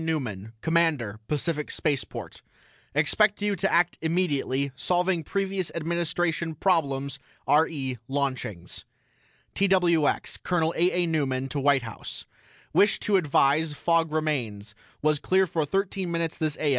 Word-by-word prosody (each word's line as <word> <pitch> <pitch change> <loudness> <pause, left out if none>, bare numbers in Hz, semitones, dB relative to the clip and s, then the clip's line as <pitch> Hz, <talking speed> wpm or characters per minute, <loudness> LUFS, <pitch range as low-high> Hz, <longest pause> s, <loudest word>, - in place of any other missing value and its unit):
NEUMAN 115 -10 -3
COMMANDER 160 -11 +1
PACIFIC 150 0 -1
SPACEPORT: 145 -4 -3 0.5
EXPECT 205 +8 +3
YOU 205 0 0
TO 195 +1 0
ACT 175 0 +2
IMMEDIATELY 145 -5 0
SOLVING 180 +2 0
PREVIOUS 195 +1 -1
ADMINISTRATION 170 0 -1
PROBLEMS 140 -6 0 0.3
RE 145 -5 +1
LAUNCHINGS 130 -10 -3 0.7
TWX 180 -6 +2
COL. 165 -2 +1
A. 175 +2 +3
A. - - +1
NEUMAN 135 -5 0
TO 140 - -2
WHITE 140 -2 +3
HOUSE: 115 -2 -8 0.5
WISH 205 0 +4
TO 205 -2 +2
ADVISE 150 -1 +2
FOG 165 +1 +1
REMAINS 120 -10 -2 0.3
WAS 155 -1 +3
CLEAR 190 +4 +3
FOR 165 -4 -1
THIRTEEN 195 +1 -1
MINUTES 170 -1 -2
THIS 155 -1 -1
A. 150 - +1
160 Hz, 125 wpm, -26 LUFS, 140-175 Hz, 0.7 s, WISH